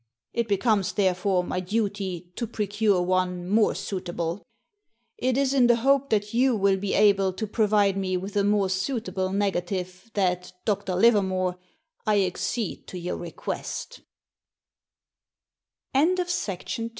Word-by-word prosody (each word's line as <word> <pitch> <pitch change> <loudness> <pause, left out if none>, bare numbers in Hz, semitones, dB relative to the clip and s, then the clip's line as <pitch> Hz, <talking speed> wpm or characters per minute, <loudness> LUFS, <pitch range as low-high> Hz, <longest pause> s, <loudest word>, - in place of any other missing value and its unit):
It 235 -1 0
becomes, 200 -2 +1
therefore, 185 -1 +1
my 180 - -2
duty 190 -3 -2
to 235 - -3
procure 210 -3 +1
one 180 -1 0
more 210 +3 +3
suitable. 175 -2 -4 0.8
It 255 0 +1
is 275 -1 +2
in 255 -3 +5
the 240 - +5
hope 275 +3 +2
that 210 0 0
you 250 +1 +3
will 195 -2 +3
be 195 +1 -2
able 200 -2 +4
to 220 +4 -3
provide 210 -2 +2
me 185 -1 -1
with 195 +3 -6
a 200 - +3
more 205 -1 +2
suitable 190 -1 -2
negative 185 0 -2
that, 180 -2 0
Dr. 200 -3 -1
Livermore, 185 -3 +2 0.5
I 210 -1 +4
accede 195 +4 -3
t 175 -1 -5
200 Hz, 120 wpm, -26 LUFS, 185-215 Hz, 0.8 s, in